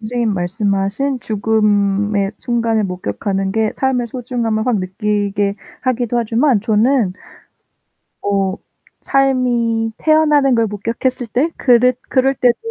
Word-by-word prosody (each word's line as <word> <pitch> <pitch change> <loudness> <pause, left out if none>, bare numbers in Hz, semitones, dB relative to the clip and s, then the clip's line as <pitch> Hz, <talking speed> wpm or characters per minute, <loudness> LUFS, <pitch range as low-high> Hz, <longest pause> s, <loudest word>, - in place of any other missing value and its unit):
선생님 225 -1 -1
말씀하신 200 +7 -1
죽음의 205 -2 +1
순간을 230 -2 0
목격하는 190 - -3
게 220 0 0
삶의 255 -3 0
소중함을 235 -2 -2
확 240 -5 +2
느끼게 200 +1 -1 0.3
하기도 245 -2 0
하지만 235 +1 +2
저는 220 0 +2 1.1
어 195 -2 0 0.5
삶이 245 -4 +1
태어나는 300 -4 +3
걸 230 -1 +2
목격했을 230 +4 -3
때 260 +8 0
그랬 250 0 +4
그럴 270 0 +2
때도 245 -2 +3
225 Hz, 260 characters per minute, -17 LUFS, 205-250 Hz, 1.1 s, 그랬